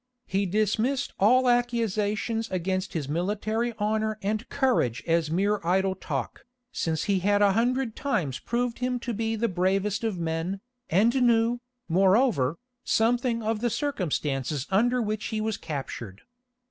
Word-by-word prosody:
He 195 +1 0
dismissed 215 +7 0
all 250 +6 +5
accusations 230 -2 0
against 185 +1 -2
his 155 -5 -2
military 210 +8 -1
honour 215 +1 0
and 215 +4 -2
courage 250 - +1
as 165 -2 +1
mere 200 +5 +1
idle 190 +2 +2
talk, 190 - -5 0.3
since 160 -1 -1
he 200 -2 +1
had 205 +2 +3
a 200 - +5
hundred 240 +2 0
times 160 - -1
proved 240 +4 -2
him 250 0 0
to 240 - -3
be 225 +1 -1
the 230 +2 0
bravest 195 +3 0
of 220 -5 -1
men, 165 +3 -2 0.3
and 210 +8 +4
knew, 235 0 +3 0.3
moreover, 190 - +3 0.3
something 235 +1 +1
of 220 0 0
the 240 - +1
circumstances 155 - -2
under 240 +6 +3
which 215 0 -3
he 220 - -2
was 215 -1 -1
captured. 120 -9 -6
210 Hz, 145 wpm, -27 LUFS, 185-235 Hz, 0.3 s, all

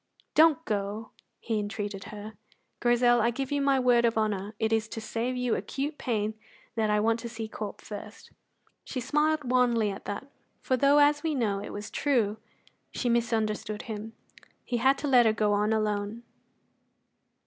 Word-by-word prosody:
"Don't 320 0 +5
go," 210 +1 -3 0.3
he 225 -2 -1
entreated 205 -1 -4
her. 210 +1 -8 0.5
"Grizel, 240 0 +4
I 235 - +3
give 265 +3 -3
you 285 0 +1
my 275 -1 +3
word 245 -2 +4
of 230 -1 +2
honour 210 -1 -1
it 220 0 0
is 220 -1 +1
to 225 - -6
save 230 +3 -2
you 250 -2 0
acute 290 +3 -3
pain 215 -3 -1 0.4
that 220 -2 0
I 210 0 +3
want 225 +2 +2
to 235 - -6
see 225 -1 -5
Corp 215 -1 -6
first." 210 +1 -9 0.5
She 260 - -4
smiled 300 +1 +1
wanly 240 -4 +3
at 195 - -9
that, 205 +6 -4 0.3
for 260 - 0
though, 280 +3 +4
as 290 0 +5
we 315 -1 -1
know, 210 -6 0
it 200 - -7
was 205 0 -7
true, 230 -7 +1 0.5
she 245 - -2
misunderstood 220 -2 0
him. 220 -1 -6 0.5
He 245 - -1
had 265 +4 +3
to 290 - -3
let 250 -4 +6
her 220 - +3
go 210 -1 +1
on 210 +1 +2
alone. 215 +1 -1
225 Hz, 175 wpm, -28 LUFS, 210-255 Hz, 0.5 s, let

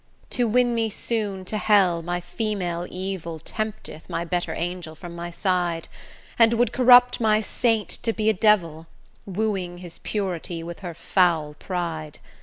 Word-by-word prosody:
To 245 -1 +1
win 245 +2 +3
me 225 -1 +1
soon 205 -3 -2
to 215 +3 -2
hell, 190 -6 +4
my 175 +1 -2
female 180 -5 -3
evil, 185 -3 -4
Tempteth 215 -2 -6
my 170 - -2
better 175 0 -1
angel 170 -2 -4
from 170 +1 -9
my 170 0 -5
side, 175 -2 -1 0.5
And 230 0 +6
would 240 +1 +2
corrupt 245 -1 +7
my 215 -1 +4
saint 225 0 +1
to 230 - +1
be 220 -1 -2
a 220 - +5
devil, 175 -6 +2 0.4
Wooing 190 -3 -2
his 175 -2 -9
purity 180 -4 -3
with 170 0 -7
her 175 -4 -6
foul 165 -5 +2
pride. 160 -2 -4
185 Hz, 155 wpm, -24 LUFS, 170-215 Hz, 0.5 s, corrupt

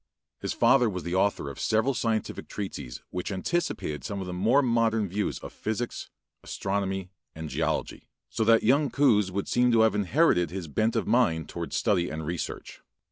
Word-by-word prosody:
His - - -3
father 125 -4 +4
was 90 -3 -5
the 85 - -4
author 95 -5 +1
of 70 - -7
several 110 +5 +1
scientific 115 -3 -2
treatises 70 -12 -6
which 90 +3 -4
anticipated 95 - -2
some 100 - -4
of 95 - -4
the 90 - -5
more 115 +10 +3
modern 115 -3 +2
views 100 +3 -2
of - - -9
physics, 110 +2 -4 0.3
astronomy, 95 -1 -3 0.2
and 80 -1 -6
geology; - - -2 0.2
so 75 - -1
that 115 0 +5
young 140 +5 +3
Coues 105 -9 +3
would 100 +1 -3
seem 125 0 +3
to 115 -1 +4
have 110 0 +4
inherited 105 - +2
his 90 -1 -5
bent 110 +10 0
of 115 - 0
mind 105 -9 +2
towards 85 -1 -5
study 95 -6 +1
and 80 0 -5
research. 85 +1 -5
100 Hz, 180 wpm, -27 LUFS, 90-115 Hz, 0.3 s, that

